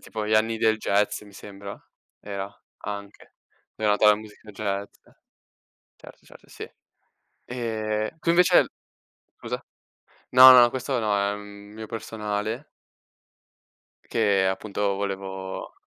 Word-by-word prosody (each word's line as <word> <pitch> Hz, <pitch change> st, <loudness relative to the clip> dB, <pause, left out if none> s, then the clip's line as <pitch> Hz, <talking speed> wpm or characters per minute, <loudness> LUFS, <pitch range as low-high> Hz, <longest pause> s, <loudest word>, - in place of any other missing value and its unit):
tipo 110 Hz, -2 st, -5 dB
gli 110 Hz, -, +1 dB
anni 110 Hz, +1 st, +2 dB
del 110 Hz, 0 st, +3 dB
jazz 105 Hz, -1 st, 0 dB
mi 100 Hz, -1 st, -15 dB
sembra, 100 Hz, 0 st, -9 dB, 0.4 s
era, 100 Hz, -1 st, -5 dB, 0.4 s
anche, 100 Hz, 0 st, -8 dB, 0.4 s
dove 110 Hz, -1 st, -1 dB
è -, -, +5 dB
nata 105 Hz, +1 st, +3 dB
la 105 Hz, -, +8 dB
musica 105 Hz, 0 st, -13 dB
jazz. 100 Hz, -1 st, -3 dB, 1.1 s
Certo, -, -, -16 dB
certo, -, -, -17 dB
sì. -, -, -9 dB, 0.8 s
E 110 Hz, -2 st, -3 dB
tu 165 Hz, -, +1 dB
invece 180 Hz, +1 st, +5 dB, 0.7 s
scusa? -, -, -5 dB, 0.7 s
No, 130 Hz, +1 st, +10 dB
no, 120 Hz, -1 st, +8 dB
questo 130 Hz, 0 st, -2 dB
no, 105 Hz, -2 st, +1 dB
è 100 Hz, 0 st, +1 dB
un 105 Hz, 0 st, -10 dB
mio 110 Hz, +1 st, -8 dB
personale 110 Hz, +2 st, -4 dB, 1.4 s
che 100 Hz, -4 st, +2 dB
appunto 100 Hz, +1 st, -1 dB
volevo 95 Hz, -1 st, -5 dB
105 Hz, 125 wpm, -25 LUFS, 100-110 Hz, 1.4 s, No